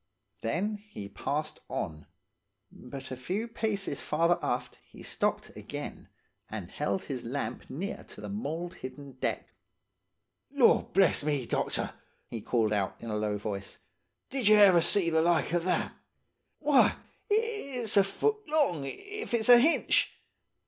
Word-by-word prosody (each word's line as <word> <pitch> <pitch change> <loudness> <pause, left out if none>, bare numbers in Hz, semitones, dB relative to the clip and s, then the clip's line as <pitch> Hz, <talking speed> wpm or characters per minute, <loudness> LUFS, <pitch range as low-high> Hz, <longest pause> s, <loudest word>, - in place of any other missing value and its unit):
Then 195 - -1
he 205 - -9
passed - - -3
on; 75 -1 -4 0.6
but 130 +1 -9
a - - -2
few 185 - -3
paces 210 -9 -2
farther 170 +3 +2
aft - - -2
he - - -14
stopped - - -1
again, - - -7 0.4
and - - -6
held 100 -1 -1
his 130 -3 -4
lamp 135 +4 -4
near 175 +10 -4
to - - -12
the - - -6
mould 175 -4 -4
hidden 135 +2 -8
deck. - - -2 1.0
"'Lord 280 -4 +4
bless 190 -6 +4
me, 145 -4 0
doctor,' - - -1 0.3
he 115 - -6
called 110 -1 +1
out, 100 -2 0
in 115 - -6
a - - -1
low 105 -1 0
voice, 100 -1 -5 0.5
'did 260 -5 0
ye 215 - +8
ever 195 -5 +7
see 170 0 +2
the 160 0 +4
like 170 -1 +2
of 175 -1 +1
that? 185 - 0 0.6
Why, 290 -3 +4 0.3
it's 410 - 0
a 200 - +7
foot 425 - -1
long, 280 - +1
if 400 - -4
it's 225 0 +2
a 245 -1 +11
hinch! 315 +7 +3
175 Hz, 150 wpm, -30 LUFS, -, 1.0 s, a